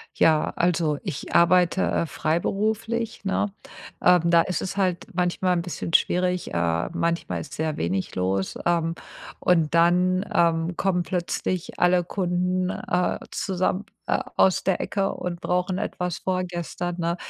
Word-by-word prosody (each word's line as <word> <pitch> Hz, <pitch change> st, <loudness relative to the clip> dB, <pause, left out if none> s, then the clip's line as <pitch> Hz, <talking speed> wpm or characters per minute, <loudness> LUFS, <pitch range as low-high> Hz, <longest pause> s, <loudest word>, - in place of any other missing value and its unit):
Ja, 155 Hz, -2 st, +3 dB
also 165 Hz, -4 st, +1 dB
ich 140 Hz, -, -5 dB
arbeite, 180 Hz, +1 st, +4 dB
äh, -, -, +1 dB
freiberuflich, 215 Hz, +9 st, -1 dB
ne? 195 Hz, +1 st, 0 dB, 0.5 s
Ähm, 180 Hz, -2 st, +6 dB
da 170 Hz, -1 st, +5 dB
ist 180 Hz, -, -2 dB
es 190 Hz, -, -4 dB
halt 185 Hz, -3 st, 0 dB
manchmal 180 Hz, +1 st, +1 dB
'n 170 Hz, -, 0 dB
bisschen 170 Hz, -1 st, -5 dB
schwierig, 180 Hz, 0 st, +1 dB
äh, 85 Hz, -1 st, 0 dB
manchmal 165 Hz, -, -1 dB
ist -, -, -10 dB
sehr 155 Hz, -1 st, -2 dB
wenig 95 Hz, +3 st, -2 dB
los, 95 Hz, +1 st, -1 dB
ähm, 170 Hz, -1 st, +1 dB, 0.4 s
und 165 Hz, -3 st, +2 dB
dann, 180 Hz, +3 st, +3 dB
ähm, 165 Hz, 0 st, +2 dB
kommen 180 Hz, -3 st, +1 dB
plötzlich 180 Hz, 0 st, -3 dB
alle 180 Hz, 0 st, +4 dB
Kunden, 180 Hz, 0 st, -1 dB
äh, 180 Hz, 0 st, -1 dB
zusammen, 185 Hz, +1 st, -1 dB, 0.2 s
äh, -, -, +2 dB, 0.2 s
aus 190 Hz, -, +4 dB
der 190 Hz, -, +1 dB
Ecke 195 Hz, -1 st, -1 dB
und 175 Hz, -1 st, -5 dB
brauchen 180 Hz, +1 st, -1 dB
etwas 180 Hz, -3 st, -3 dB
vorgestern, 175 Hz, -1 st, -3 dB
ne? 170 Hz, 0 st, -1 dB
175 Hz, 140 wpm, -24 LUFS, 165-185 Hz, 0.5 s, Ähm